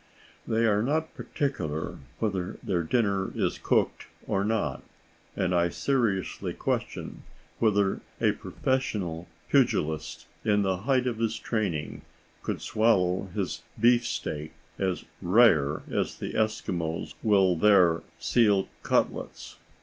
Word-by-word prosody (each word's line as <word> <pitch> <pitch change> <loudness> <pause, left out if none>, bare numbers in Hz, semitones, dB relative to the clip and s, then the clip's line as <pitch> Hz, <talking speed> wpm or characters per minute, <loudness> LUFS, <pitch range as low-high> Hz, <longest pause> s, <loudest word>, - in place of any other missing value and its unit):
They 115 +1 +2
are 105 -2 +3
not 155 +6 0
particular 80 - -3 0.2
whether 95 -5 -2
their 95 -7 0
dinner 100 0 0
is - - -1
cooked - - +1 0.2
or 100 - 0
not, 105 -10 -1 0.5
and 90 -1 0
I 85 0 +3
seriously 110 - -1
question - - -3 0.4
whether 100 -3 +2 0.2
a - - +3
professional 95 -10 -2 0.2
pugilist 80 0 +1 0.2
in 105 -1 +3
the 95 -1 +1
height 130 +5 +1
of 120 -3 -2
his 115 -1 0
training 95 -10 -2 0.4
could - - -4
swallow 95 -4 +2
his 95 -5 -2 0.2
beef 120 +1 +4
steak 75 +1 -4 0.3
as 95 -2 -1 0.2
"rare" 85 -8 +4
as - - -1
the - - -5
Eskimos 90 -7 -1
will 95 -4 +4
their 90 -3 +5 0.2
seal 105 -5 +2
cutlets. - - -1
100 Hz, 120 wpm, -28 LUFS, 90-115 Hz, 0.5 s, their